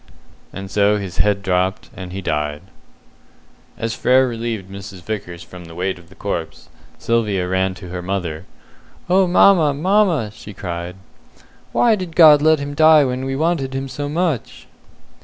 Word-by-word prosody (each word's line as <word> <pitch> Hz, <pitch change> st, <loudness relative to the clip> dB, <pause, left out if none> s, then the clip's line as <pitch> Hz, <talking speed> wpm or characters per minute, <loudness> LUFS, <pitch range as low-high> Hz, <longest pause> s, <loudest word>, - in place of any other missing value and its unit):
And 95 Hz, 0 st, -8 dB
so 105 Hz, +1 st, +3 dB
his 95 Hz, -3 st, -6 dB
head 100 Hz, +1 st, +1 dB
dropped, 95 Hz, +1 st, -1 dB
and 90 Hz, -2 st, -8 dB
he 95 Hz, +1 st, -6 dB
died. 75 Hz, -2 st, -2 dB, 1.1 s
As 115 Hz, -1 st, -3 dB
Frere 130 Hz, +3 st, +3 dB
relieved 115 Hz, -4 st, -4 dB
Mrs. 95 Hz, -1 st, -10 dB
Vickers 90 Hz, -5 st, -6 dB
from 90 Hz, -1 st, -12 dB
the 85 Hz, 0 st, -12 dB
weight 90 Hz, +1 st, -2 dB
of 85 Hz, -1 st, -19 dB
the -, -, -17 dB
corpse, -, -, -5 dB, 0.3 s
Sylvia 105 Hz, -6 st, 0 dB
ran 95 Hz, 0 st, 0 dB
to 90 Hz, -1 st, -10 dB
her 90 Hz, 0 st, -5 dB
mother. 90 Hz, -3 st, -4 dB, 0.7 s
"Oh, 190 Hz, 0 st, +4 dB
mamma, 175 Hz, -5 st, +5 dB
mamma," 175 Hz, -, +2 dB
she 105 Hz, -2 st, -11 dB
cried, 85 Hz, -1 st, -5 dB, 0.8 s
"why 235 Hz, -, +3 dB
did 185 Hz, -5 st, -4 dB
God 155 Hz, -4 st, +8 dB
let 155 Hz, +1 st, +4 dB
him 140 Hz, 0 st, -5 dB
die 155 Hz, 0 st, +6 dB
when 130 Hz, 0 st, -3 dB
we 135 Hz, 0 st, -2 dB
wanted 145 Hz, -3 st, -1 dB
him 135 Hz, 0 st, -3 dB
so 145 Hz, +2 st, -5 dB
much?" 160 Hz, -5 st, -2 dB
105 Hz, 160 wpm, -19 LUFS, 95-145 Hz, 1.1 s, God